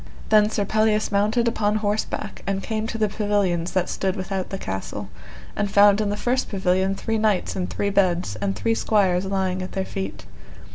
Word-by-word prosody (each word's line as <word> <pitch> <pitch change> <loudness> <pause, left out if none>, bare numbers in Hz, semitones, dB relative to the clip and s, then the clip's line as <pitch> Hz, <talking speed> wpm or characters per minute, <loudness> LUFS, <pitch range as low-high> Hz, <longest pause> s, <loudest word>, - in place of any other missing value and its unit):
Then 215 -1 +5
Sir 205 -2 -1
Pelleas 215 +1 +1
mounted 215 +4 +2
upon 215 -2 +1
horseback, 210 0 -2
and 195 0 -1
came 220 -1 -2
to 225 - -4
the 215 -1 +2
pavilions 200 -5 0
that 180 -1 +1
stood 190 -1 -1
without 190 0 -3
the 195 - -4
castle, 95 - -5 0.5
and 205 - -1
found 205 +1 +5
in 210 - 0
the 205 - -2
first 250 +4 0
pavilion 190 0 +1
three 225 +2 -2
knights 215 -3 +1
in 180 -1 -2
three 200 - -2
beds, 180 - +1
and 100 -2 -2
three 225 - 0
squires 195 -5 +2
lying 190 -1 -1
at 185 - -6
their 190 -1 -2
feet. 95 - -5
200 Hz, 190 wpm, -23 LUFS, 185-215 Hz, 0.5 s, Then